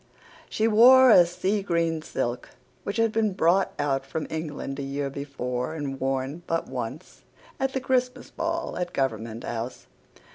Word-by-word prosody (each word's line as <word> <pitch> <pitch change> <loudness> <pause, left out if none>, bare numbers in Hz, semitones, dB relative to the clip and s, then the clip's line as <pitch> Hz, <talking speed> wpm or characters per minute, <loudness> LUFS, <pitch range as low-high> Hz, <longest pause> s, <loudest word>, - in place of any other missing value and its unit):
She 220 - +1
wore 245 +2 +8
the 175 -1 +7
sea 195 +4 -1
green 170 -4 0
silk 120 -5 -3 0.3
which 200 - -4
had 225 -1 +2
been 215 -2 +1
brought 185 +1 +2
out 135 -2 0
from 160 +3 -4
England 150 -3 -4
a - - -2
year 140 0 -3
before 135 -1 -4
and 140 -3 -4
worn 135 +4 -2
but 165 0 -1
once 130 +2 -6 0.4
at 270 0 0
the 265 - 0
Christmas 255 -1 -1
ball 330 0 -3
at 175 0 -3
Government 115 -4 -2
House. 120 +2 -5
160 Hz, 155 wpm, -26 LUFS, 135-210 Hz, 0.4 s, wore